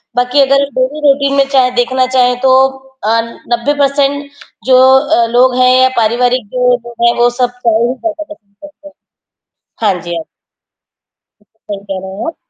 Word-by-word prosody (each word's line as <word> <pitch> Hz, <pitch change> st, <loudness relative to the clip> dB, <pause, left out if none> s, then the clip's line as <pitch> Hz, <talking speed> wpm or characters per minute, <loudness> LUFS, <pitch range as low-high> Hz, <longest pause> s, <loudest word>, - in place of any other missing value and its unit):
बाकी 250 Hz, +3 st, +1 dB
अगर 275 Hz, +1 st, +3 dB
daily 260 Hz, +4 st, -1 dB
routine 275 Hz, 0 st, +1 dB
में 275 Hz, -, +3 dB
चाहे 255 Hz, -2 st, +3 dB
देखना 255 Hz, +1 st, 0 dB
चाहें 250 Hz, -1 st, +2 dB
तो 260 Hz, -1 st, +3 dB, 0.5 s
अ, 215 Hz, -, -1 dB, 0.4 s
90 240 Hz, +5 st, 0 dB
पर्सेन्ट 285 Hz, 0 st, 0 dB, 0.3 s
जो 260 Hz, -1 st, +4 dB, 0.2 s
अ, 235 Hz, -5 st, +1 dB
लोग 250 Hz, +1 st, +3 dB
हैं 255 Hz, 0 st, +4 dB
या 260 Hz, -, +4 dB
पारिवारिक 240 Hz, +1 st, +1 dB
जो 250 Hz, 0 st, +1 dB
लोग 235 Hz, -1 st, -11 dB
हैं, 235 Hz, -, +3 dB
वो 240 Hz, 0 st, +4 dB
सब 245 Hz, 0 st, -1 dB
चाय 235 Hz, -3 st, -1 dB
ही 250 Hz, -, -2 dB
ज़्यादा 315 Hz, +3 st, -5 dB
पसंद 210 Hz, -11 st, -16 dB
करते 295 Hz, 0 st, -14 dB
है। -, -, -14 dB, 1.0 s
हाँ 180 Hz, -3 st, -1 dB
जी, 175 Hz, 0 st, -6 dB
हाँ। 165 Hz, -, -5 dB, 1.5 s
सही 200 Hz, -1 st, -6 dB
कह 190 Hz, -1 st, -3 dB
रहे 190 Hz, 0 st, -8 dB
हैं, -, -, -4 dB
आप। 330 Hz, -, -6 dB
255 Hz, 180 wpm, -12 LUFS, 240-275 Hz, 1.5 s, जो